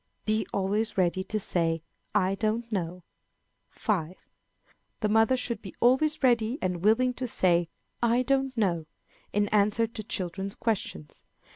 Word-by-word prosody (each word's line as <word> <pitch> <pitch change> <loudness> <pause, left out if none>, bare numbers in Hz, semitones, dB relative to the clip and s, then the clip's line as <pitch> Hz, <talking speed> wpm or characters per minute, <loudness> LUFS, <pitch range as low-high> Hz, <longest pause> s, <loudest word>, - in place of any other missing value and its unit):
Be 215 -2 0
always 205 +3 0
ready 185 0 +2
to 215 +2 -1
say 165 -4 0 0.3
"I 190 +1 +3
don't 225 +3 -1
know." 180 -3 -3 0.7
5. 185 -6 -2 0.9
The 210 - +1
mother 225 +4 +4
should 235 -3 -2
be 195 - -9
always 270 +5 +3
ready 240 0 +3
and 180 -1 -2
willing 250 +4 +4
to 250 +1 -4
say 175 -6 +2 0.3
"I 240 +1 +3
don't 270 -1 0
know," 170 -7 0 0.4
in 205 0 +1
answer 210 +2 +3
to 225 -1 -7
children's 195 0 -4
questions. 185 - -3
215 Hz, 140 wpm, -28 LUFS, 185-235 Hz, 0.9 s, mother